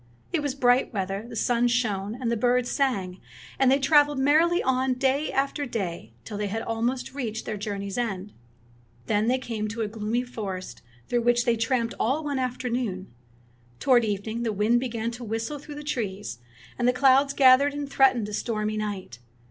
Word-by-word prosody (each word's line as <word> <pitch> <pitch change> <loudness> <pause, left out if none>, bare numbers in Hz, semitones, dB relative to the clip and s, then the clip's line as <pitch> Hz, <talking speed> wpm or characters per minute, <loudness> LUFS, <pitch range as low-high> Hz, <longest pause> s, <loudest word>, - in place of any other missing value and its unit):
It 330 - +1
was 285 -2 -2
bright 250 -1 +3
weather, 195 +3 -3
the 235 - -8
sun 240 +2 +2
shone, 220 -2 -1
and 240 -3 -1
the - - +2
birds 245 +2 +1
sang, 195 -10 -1 0.4
and 270 - +5
they 270 - +5
traveled 290 0 +4
merrily 315 +6 +3
on 260 0 +1
day 270 +3 +1
after 275 +1 -1
day 175 - -4
till 205 - -6
they 210 - -1
had 225 +3 -3
almost 235 +4 -2
reached 230 -5 -4
their 215 - -3
journey's 200 0 -4
end. 205 -4 -3 0.7
Then 210 - +1
they 255 +2 +3
came 225 -4 -4
to 225 +2 -4
a - - -1
gloomy 220 +3 -2
forest 195 - -6 0.3
through 240 -1 +1
which 240 0 +2
they 235 -2 +3
tramped 230 0 0
all 275 +7 +1
one 285 -3 -2
afternoon. 245 - -3 0.7
Toward 250 -3 +4
evening 220 +2 -2
the 230 -2 0
wind 215 +4 +2
began 235 -2 -3
to 240 +1 -8
whistle 225 +6 -3
through 295 +1 -10
the 295 - -7
trees, 205 - -4 0.4
and 245 - +2
the 250 - +4
clouds 270 +2 +4
gathered 275 +1 +5
and 290 -1 -3
threatened 260 -5 +3
a 210 - -7
stormy 215 -1 -2
night. 195 - -5
240 Hz, 185 wpm, -26 LUFS, 210-260 Hz, 0.7 s, and